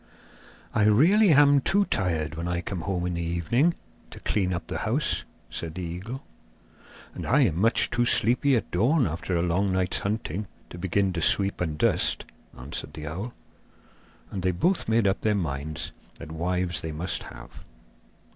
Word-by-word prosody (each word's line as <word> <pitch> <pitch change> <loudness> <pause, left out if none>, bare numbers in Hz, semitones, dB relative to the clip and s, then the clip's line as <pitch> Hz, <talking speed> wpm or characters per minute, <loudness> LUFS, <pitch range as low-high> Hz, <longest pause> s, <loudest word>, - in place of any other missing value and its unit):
'I 105 - +3
really 175 - +5
am 145 -2 +6
too 200 +8 +2
tired 80 - -1
when 85 +2 -4
I 90 -1 -1
come 90 0 -4
home 90 -1 -2
in 90 - -2
the 85 - -3
evening 85 - +1 0.3
to - - -10
clean 95 -3 0
up 85 - -3
the - - -4
house,' - - 0 0.3
said 80 -1 -4
the 90 - -4
eagle. 95 +11 -6 0.9
'And - - -6
I 140 +5 +4
am 90 - +2
much 115 +2 +2
too 120 - +1
sleepy 125 +5 +3
at 115 - -2
dawn 125 - +3
after 85 +2 -3
a 85 - +1
long 95 +3 +1
night's 95 -1 0
hunting 105 -2 -3 0.2
to 85 - -8
begin 95 +1 0
to 85 - -2
sweep 100 +4 +3
and 80 -4 -2
dust,' - - +1 0.3
answered 65 +5 -5
the 75 -1 -7
owl. 95 +11 -5 1.0
And 95 - -4
they 95 - +1
both 115 - 0
made 115 -1 +3
up 95 0 +1
their 105 -1 +2
minds 75 -3 -3 0.2
that 80 -1 -10
wives 90 0 -1
they 80 - -4
must 85 +5 -2
have. - - -11
95 Hz, 175 wpm, -26 LUFS, 85-115 Hz, 1.0 s, am